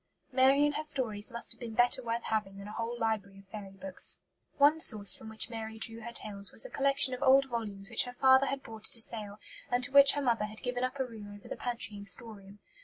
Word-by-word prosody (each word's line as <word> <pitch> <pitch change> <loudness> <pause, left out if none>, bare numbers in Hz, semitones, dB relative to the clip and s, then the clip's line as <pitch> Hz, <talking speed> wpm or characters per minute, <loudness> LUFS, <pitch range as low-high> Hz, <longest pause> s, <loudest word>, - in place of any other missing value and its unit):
Mary 270 +2 +4
and 295 - 0
her - - -2
stories 240 -9 -1
must 235 0 -3
have - - -25
been 230 -2 -7
better 245 +2 +3
worth 235 -1 -3
having 210 -3 -3
than 200 +1 -9
a - - -8
whole 230 +2 -4
library 215 -4 -3
of 195 0 -17
"fairy 200 -2 -9
books." 190 -1 0 0.4
One 295 +2 +4
source 210 -9 +6
from 220 - -10
which 220 0 -2
Mary 220 -1 -7
drew 225 +1 -4
her 235 +1 -7
tales 200 -3 -2
was - - 0
a - - -9
collection 275 -1 +3
of 250 - -6
old 270 0 +5
volumes 210 -6 -5
which - - +3
her 245 - -8
father 265 +2 +4
had 275 -1 -4
bought 220 -1 -8
at - - +2
a 230 - -7
sale 210 -3 -3 0.3
and 245 0 0
to 275 - +1
which 280 0 +7
her 290 - -2
mother 230 -4 +1
had 215 +1 -10
given 250 0 -3
up 255 +2 -3
a 265 - 0
room 215 -4 -11
over 205 - -14
the - - -6
pantry 235 -4 -5
and 200 0 -9
storeroom. 200 -1 -6
230 Hz, 250 wpm, -30 LUFS, 210-260 Hz, 0.4 s, which